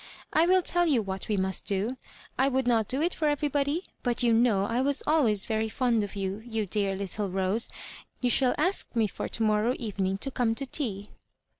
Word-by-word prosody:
I 320 Hz, +2 st, +4 dB
will 370 Hz, 0 st, +4 dB
tell 350 Hz, 0 st, +2 dB
you 260 Hz, -8 st, +2 dB
what 190 Hz, -1 st, -5 dB
we 210 Hz, -, 0 dB
must 190 Hz, 0 st, -1 dB
do. 205 Hz, +6 st, 0 dB, 0.4 s
I 265 Hz, -, +2 dB
would 265 Hz, -1 st, 0 dB
not 230 Hz, -3 st, +2 dB
do 270 Hz, +6 st, -1 dB
it 350 Hz, -, 0 dB
for 310 Hz, -, -1 dB
everybody; 290 Hz, +2 st, 0 dB, 0.2 s
but 245 Hz, -2 st, -1 dB
vou 235 Hz, -2 st, +3 dB
know 225 Hz, -4 st, +3 dB
I 230 Hz, +4 st, 0 dB
was 280 Hz, +1 st, +1 dB
always 235 Hz, -11 st, +3 dB
very 220 Hz, 0 st, -1 dB
fond 235 Hz, -1 st, +1 dB
of 205 Hz, 0 st, -5 dB
you, 195 Hz, +1 st, -3 dB
you 225 Hz, -3 st, -3 dB
dear 200 Hz, 0 st, -1 dB
little 200 Hz, +1 st, -4 dB
Rose. 190 Hz, +4 st, 0 dB, 0.5 s
Tou -, -, +3 dB
shall 255 Hz, +1 st, +4 dB
ask 365 Hz, -3 st, 0 dB
me 225 Hz, -2 st, +3 dB
for 205 Hz, -, -4 dB
to 225 Hz, -, -1 dB
morrow 215 Hz, +3 st, +2 dB
evening 195 Hz, -5 st, -2 dB
to 270 Hz, +7 st, -2 dB
come 235 Hz, -3 st, 0 dB
to 275 Hz, -, -3 dB
tea." 215 Hz, -8 st, -3 dB
230 Hz, 210 wpm, -28 LUFS, 205-270 Hz, 0.5 s, I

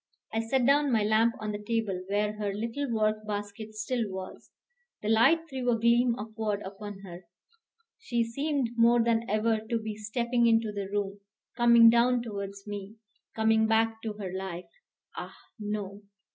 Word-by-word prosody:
I 225 Hz, -, +1 dB
set 240 Hz, +3 st, +1 dB
down 285 Hz, +1 st, +4 dB
my 220 Hz, -3 st, +3 dB
lamp 220 Hz, +2 st, +3 dB
on 215 Hz, -1 st, -3 dB
the 205 Hz, 0 st, -5 dB
table 210 Hz, -4 st, -2 dB
where 210 Hz, +1 st, 0 dB
her 205 Hz, -1 st, -1 dB
little 235 Hz, +6 st, -3 dB
work 215 Hz, -1 st, +1 dB
basket 205 Hz, +1 st, -5 dB
still 220 Hz, 0 st, -2 dB
was; 190 Hz, 0 st, -8 dB, 0.5 s
the 210 Hz, -, -1 dB
light 270 Hz, +10 st, +4 dB
threw 260 Hz, -4 st, -2 dB
a 235 Hz, -, +3 dB
gleam 235 Hz, +1 st, +3 dB
upward 215 Hz, -1 st, -3 dB
upon 200 Hz, 0 st, -8 dB
her, 180 Hz, -2 st, -10 dB, 0.7 s
she 240 Hz, -, 0 dB
seemed 275 Hz, +1 st, -1 dB
more 235 Hz, 0 st, +5 dB
than 230 Hz, 0 st, +1 dB
ever 215 Hz, +2 st, +1 dB
to 220 Hz, +2 st, -2 dB
be 220 Hz, -1 st, -5 dB
stepping 235 Hz, +3 st, 0 dB
into 225 Hz, -1 st, +3 dB
the 200 Hz, -2 st, -5 dB
room, 200 Hz, -1 st, -2 dB, 0.4 s
coming 235 Hz, -1 st, +7 dB
down 240 Hz, +1 st, +3 dB
towards 200 Hz, -3 st, -6 dB
me, 205 Hz, 0 st, -7 dB, 0.4 s
coming 220 Hz, 0 st, +3 dB
back 225 Hz, 0 st, +1 dB
to 220 Hz, -2 st, -4 dB
her 195 Hz, -3 st, -6 dB
life. 190 Hz, -2 st, -6 dB, 0.4 s
Ah, -, -, -7 dB, 0.2 s
no! 205 Hz, -1 st, -4 dB
220 Hz, 165 wpm, -28 LUFS, 205-235 Hz, 0.7 s, coming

